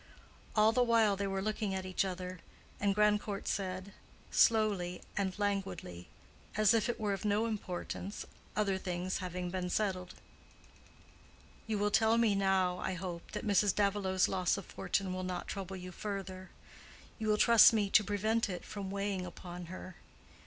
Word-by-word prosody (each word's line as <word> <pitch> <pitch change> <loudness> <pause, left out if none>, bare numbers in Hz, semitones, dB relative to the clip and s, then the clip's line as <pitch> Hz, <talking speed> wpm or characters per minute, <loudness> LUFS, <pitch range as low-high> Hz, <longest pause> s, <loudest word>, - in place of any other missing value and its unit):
All 215 0 +5
the 250 - +2
while 230 -4 +4
they 200 0 -2
were 195 0 -2
looking 210 -2 -1
at 190 0 -3
each 185 +2 0
other; 185 -1 -5 0.4
and 200 -1 +1
Grandcourt 210 -1 +1
said, 185 0 -3 0.4
slowly 205 -6 +3
and 190 -2 -1
languidly, 195 - -3 0.5
as 215 0 +5
if 225 0 +2
it 240 - -2
were 210 -2 0
of 195 - -4
no 210 +1 +2
importance, 200 -2 -4 0.3
other 200 -3 +1
things 180 0 -2
having 180 -1 -4
been 180 -1 -2
settled, 185 -3 -1 1.5
"You 220 -1 0
will 205 +1 +1
tell 220 +2 +4
me 230 -3 +4
now, 190 -2 +2
I 190 - -2
hope, 175 -1 -6
that - - -4
Mrs. 205 -1 +3
Davilow's 200 -2 +2
loss 185 0 +1
of 195 - -6
fortune 190 -2 -2
will 185 - -3
not 185 -1 -4
trouble 195 -1 -5
you 180 0 -7
further. 190 -1 -5 0.7
You 220 - -2
will 210 0 +3
trust 230 0 +8
me 210 -3 0
to 215 - +6
prevent 215 +2 0
it 180 -2 -5
from 200 -2 -6
weighing 200 -1 -2
upon 175 0 -8
her. 185 0 -9
195 Hz, 165 wpm, -33 LUFS, 185-210 Hz, 1.5 s, trust